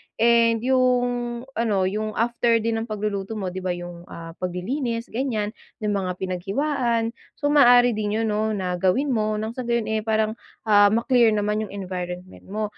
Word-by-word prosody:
and 230 0 +3
yung 245 -2 +1 0.2
ano 210 -5 +1
yung 215 +3 -2
after 235 0 +2
din 225 0 0
ng 230 - -8
pagluluto 210 0 -3
mo 190 -3 -3
di 185 - -5
ba 185 -1 -2
yung 175 0 -9
ah, 165 0 -9
paglilinis 230 +7 -3
ganyan 225 -4 -1 0.3
yung 210 - +1
mga 185 -2 -1
pinaghiwaan 230 +6 -1 0.2
so 290 0 0
maaari 245 -4 +6
din 215 0 -1
yun - - 0
no 215 +1 0
na 180 -2 -2
gawin 225 +11 +2
mo 215 -2 0
ng 220 +1 -3
sa 255 +2 -5
gayon, 235 -2 0
eh, 220 - +1
parang 220 0 +1 0.4
ah, 205 -1 +7
ma-clear 235 +1 +4
naman 210 +1 0
yung - - -14
environment 180 0 -6
mo. 215 +2 -3
215 Hz, 175 wpm, -24 LUFS, 195-235 Hz, 0.4 s, ah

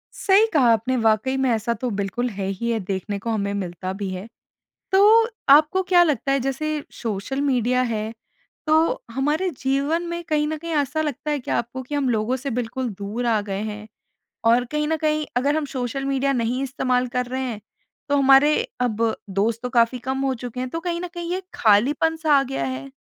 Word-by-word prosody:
सही 400 +2 +4
कहा 255 -7 +5
आपने, 230 +3 +1
वाक़ई 225 +3 +2
में, 265 -1 +1
ऐसा 230 +1 0
तो 245 +3 -3
बिल्कुल 200 +5 -2
है 200 -3 -4
ही 195 +5 -3
है, 225 - 0
देखने 195 +1 -3
को 230 - -5
हमें 200 -3 -1
मिलता 185 -1 -4
भी 200 0 -4
है। 185 +3 -6 0.7
तो 435 +4 +6 0.2
आपको 305 +6 +6
क्या 360 -1 +5
लगता 280 -5 +1
है 275 - +2
जैसे 300 +4 -2
सोशल 225 +4 -3
मीडिया 250 -2 +2
है, 220 -2 -2 0.5
तो 320 +11 +2
हमारे 300 +7 0
जीवन 280 +5 +1
में 340 0 -4
कहीं 300 -2 0
न 315 - -2
कहीं 335 +2 -6
ऐसा 295 +1 0
लगता 300 0 -3
है 295 - 0
क्या - - -1
आपको 240 +3 -4
कि 260 +4 -7
हम 285 -2 +1
लोगों 225 +2 0
से 270 +2 -5
बिल्कुल 245 +1 -2
दूर 210 +5 -3
आ 225 -2 +2
गए 200 -1 -4
हैं? 215 0 -6 0.6
और 235 +2 +4
कहीं 300 +4 -2
न 320 - 0
कहीं 305 0 0
अगर 280 +4 +2
हम 310 - -1
सोशल 255 +2 -2
मीडिया 275 0 +1
नहीं 245 +1 -1
इस्तेमाल 255 -1 0
कर 250 +1 -2
रहे 260 +2 -4
हैं, 230 -5 -4 0.5
तो 285 - +3
हमारे 275 +2 +6 0.3
अब 230 -2 +1 0.2
दोस्त 215 +4 0
तो 250 - -2
काफ़ी 240 0 +2
कम 265 +2 -3
हो 265 - +1
चुके 245 0 -5
हैं, 255 0 -3
तो 330 - -4
कहीं 340 0 -3
न 360 - -4
कहीं 345 -1 -5
ये 365 - 0
एक 380 - -8
ख़ालीपन-सा 295 +9 +3
आ - - +4
गया 265 - -3
है? 135 +1 -5
255 Hz, 210 wpm, -23 LUFS, 225-300 Hz, 0.7 s, तो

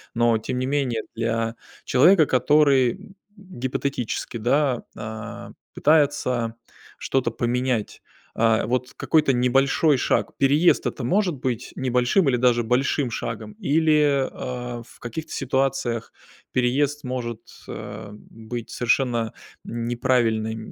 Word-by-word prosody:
Но, 120 -1 +3
тем 125 +3 -4
не 130 - -1
менее, 130 -5 0
для 115 0 -1 0.3
человека, 165 +5 +5
который, 135 -1 +4
м, 195 - -14 0.2
гипотетически, 130 - -4
да, 130 +2 +1
а, 110 +1 -7 0.2
пытается 140 -6 +2 0.4
что-то 130 -3 0
поменять, 120 -1 -1 0.3
а, 110 -1 +2
вот 125 +1 -1
какой-то 150 -4 +2
небольшой 135 +4 +3
шаг. - - 0
Переезд- 145 +5 +3
это 130 - -3
может 185 - +1
быть 125 -3 -4
небольшим 130 +6 +2
или 125 - +2
даже 120 -1 +3
большим 125 +2 0
шагом? 115 -2 -5
Или, 150 -2 +2
а, 125 -1 -5
в - - -19
каких-то 125 +7 -6
ситуациях 130 -3 -1 0.4
переезд 140 +4 +1
может, 125 -3 -4 0.3
а, 105 0 -7
быть 115 +2 -8
совершенно 120 -2 0 0.3
неправильной 115 -2 0
125 Hz, 115 wpm, -23 LUFS, 115-140 Hz, 0.4 s, человека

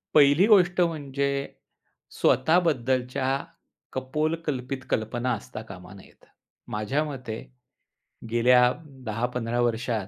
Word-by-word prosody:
पहिली 145 +4 +6
गोष्ट 185 -5 +5
म्हणजे 140 -5 0 0.9
स्वतःबद्दलच्या 130 -4 +2 0.7
कपोलकल्पित 135 -1 -2
कल्पना 120 +3 -1
असता 105 - -8
कामा - - -10
नयेत. - - -17 0.4
माझ्या 105 +8 -1
मते 130 -7 -6 0.9
गेल्या 125 +2 +5 0.4
10-15 120 +1 -2
वर्षात, 115 -3 -1
130 Hz, 85 wpm, -26 LUFS, 120-150 Hz, 0.9 s, पहिली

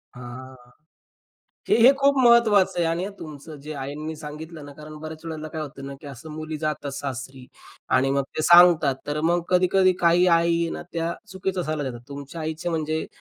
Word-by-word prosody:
हां, 125 +1 -10 1.1
हे-हे 240 +4 +7
खूप 280 0 +4
महत्वाचं 235 -7 +4
आहे 170 - +2
आणि 170 +3 -1
आ - - -6
तुमचं 155 0 -9
जे 150 +2 -7
आईंनी 150 +4 -5
सांगितलं 155 +1 -9
ना 145 - -10
कारण 155 +1 -11
बऱ्याच 155 +1 -8
वेळेला 155 -1 -6
काय 160 0 -6
होतं 135 -2 -8
ना 140 - -7
की 145 - -12
असं 140 +3 -10
मुली 155 0 -5
जातात 150 -2 -3
सासरी 130 -1 -6 0.5
आणि 135 +1 +2
मग 140 0 +1
ते 155 - 0
सांगतात. 170 -5 +6
तर 150 +1 -2
मग 170 +2 +1
कधी-कधी 185 +1 +4
काही 175 +1 +4
आई 170 -1 +3
आहे 165 - -2
ना - - -6
त्या 165 0 -2 0.2
चुकीचा 190 -1 -2
सल्ला 155 -2 -3
देतात. 120 -1 -9
तुमच्या 140 +3 -8
आईचे 160 +2 -4
म्हणजे 160 -1 -2
155 Hz, 185 wpm, -24 LUFS, 145-170 Hz, 1.1 s, हे-हे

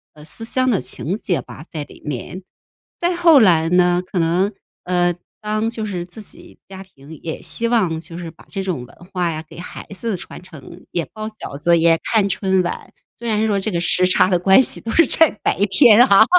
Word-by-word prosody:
呃， 150 - -14
思 225 - -5
乡 255 +2 +1
的 200 - 0
情 150 +10 -2
结 190 -5 -2
吧 - - -11
在 155 -3 -5
里 - - -16
面。 150 +6 -6 0.6
再 350 +1 -1
后 335 -4 +6
来 165 -7 +4
呢， 180 0 +3
可 185 - -7
能， 175 +4 +1 0.3
呃， 175 -1 +1 0.3
当 215 +1 -1
就 230 -2 -5
是 185 -4 -4
自 185 +5 -11
己 345 +8 -13
家 190 0 -10
庭 150 -4 -15
也 160 - -5
希 230 - 0
望 185 -9 0
就 165 +1 -10
是 170 -2 -7
把 160 - -19
这 195 - -4
种 180 -10 -3
文 - - -19 0.2
化 180 -2 0
呀， 155 0 -6
给 160 - -14
孩 180 - -9
子 205 +1 -3
传 175 - -10
承， 170 0 -14
也 170 -2 -2
包 215 0 -6
饺 215 -9 -9
子、 170 +4 +3
也 165 0 +3
看 215 -3 +1
春 190 -1 +1
晚， 175 - -6 0.3
虽 235 - -7
然 215 0 +1
说 205 -2 +1
这 195 - -2
个 170 - -1
时 180 +1 +2
差 185 - +3
的 180 -2 +2
关 190 +4 +5
系 - - +6
都 230 - -5
是 330 +7 +4
在 325 -2 +5
白 - - 0
天 225 +2 +6
啊， 220 -3 +6
185 Hz, 235 characters per minute, -19 LUFS, 170-215 Hz, 0.6 s, 后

